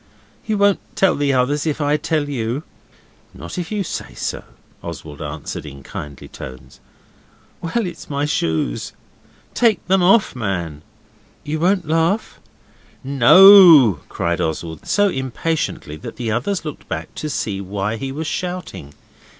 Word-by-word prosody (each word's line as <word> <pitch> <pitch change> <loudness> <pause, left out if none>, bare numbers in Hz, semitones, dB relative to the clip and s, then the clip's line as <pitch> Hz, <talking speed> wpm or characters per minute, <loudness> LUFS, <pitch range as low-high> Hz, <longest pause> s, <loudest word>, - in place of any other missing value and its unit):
'You 215 -1 0
won't 200 -1 +3 0.2
tell 190 -2 +3
the 145 -1 0
others 140 +4 +1
if 155 0 -1
I 145 0 +2
tell 150 -1 -1
you?' 125 +1 -3 0.7
'Not 85 - -7
if 175 +1 -5
you 210 -2 -1
say - - -6 0.2
not,' - - -9 0.4
Oswald 75 -2 -8
answered 75 0 -6
in 70 -2 -10
kindly 70 -1 -8
tones. 65 0 -11 0.8
'Well, 215 +7 -1
it's 175 -2 -8
my 140 0 -1
shoes.' 80 - -1 0.6
'Take 230 -3 +2
them 190 0 +3
off, 195 - +4
man.' 90 - -3 0.6
'You 155 +1 -3
won't 180 0 +1
laugh?' 165 +7 0 0.6
'NO!' 140 - +8
cried 85 +1 -2
Oswald, 80 -1 -4
so 205 0 +3
impatiently 130 - -3
that - - -9
the 115 -3 -3
others 160 - -2
looked 150 - -8
back - - -5
to 155 - -5
see 105 -6 -3
why 100 +3 -3
he 135 +3 -5
was 155 +4 -4
shouting. 175 - -5
140 Hz, 140 wpm, -20 LUFS, -, 0.8 s, NO